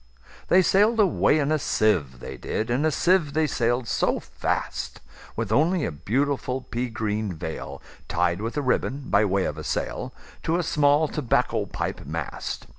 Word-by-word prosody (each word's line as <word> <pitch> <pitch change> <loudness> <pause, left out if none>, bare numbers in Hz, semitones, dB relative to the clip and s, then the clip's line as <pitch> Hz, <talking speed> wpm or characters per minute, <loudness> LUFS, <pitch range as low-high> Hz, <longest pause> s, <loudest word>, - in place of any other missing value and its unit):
They 185 +1 +5
sail'd 210 +5 +3
away 185 -6 +4
in 145 0 +1
a 155 - +2
sieve, 75 - +1
they - - -7
did, 115 +2 -3
In 135 +6 +1
a - - +4
sieve 170 -2 +2
they 160 +1 +2
sail'd 120 -3 0
so - - +1
fast, - - -3 0.4
With 110 -2 -3
only 160 +7 +3
a - - -2
beautiful 130 - -1
pea 125 0 -3
green 110 -3 -2
veilTied 85 +2 -3
with 115 +6 -4
a 145 - 0
ribbon, 135 +1 -1
by 105 +1 +5
way 95 -1 +1
of 75 - -3
a - - -6
sail, - - -3 0.3
To 165 - 0
a 180 - 0
small 150 0 +3
tobacco 145 -5 0
pipe - - -4
mast. - - -4
125 Hz, 170 wpm, -25 LUFS, 105-155 Hz, 0.4 s, They